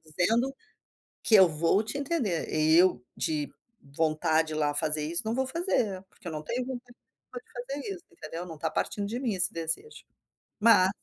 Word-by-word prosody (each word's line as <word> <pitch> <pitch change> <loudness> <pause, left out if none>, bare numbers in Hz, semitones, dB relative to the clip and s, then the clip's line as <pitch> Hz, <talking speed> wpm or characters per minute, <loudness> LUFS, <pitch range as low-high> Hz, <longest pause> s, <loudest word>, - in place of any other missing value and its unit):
dizendo, 225 - +1 0.7
que 220 - +3
eu 190 -3 +8
vou 165 +6 +2
te 255 +6 -4
entender. 255 - -1
Eu 155 -3 +4
de 150 -2 -1 0.4
vontade 160 0 +2
de - - -5
ir - - -3
lá 150 -1 +1
fazer 150 0 0
isso, 170 +2 0
não 220 +1 -1
vou 265 - +1
fazer, 255 - 0
porque 180 - -19
eu - - -5
não 155 - -4
tenho 245 +10 -2
vontade 245 -1 -7
nenhuma 250 - -13
de - - -25
fazer 275 +9 -5
isso, 355 - -13
entendeu, 165 +3 -7
não 165 -2 -8
tá - - -1
partindo 205 -1 -2
de 235 +4 -3
mim, 235 -6 -1
esse 180 0 +2
desejo." 165 - -3 0.6
Mas 205 -4 +6
185 Hz, 190 wpm, -28 LUFS, 160-245 Hz, 0.7 s, eu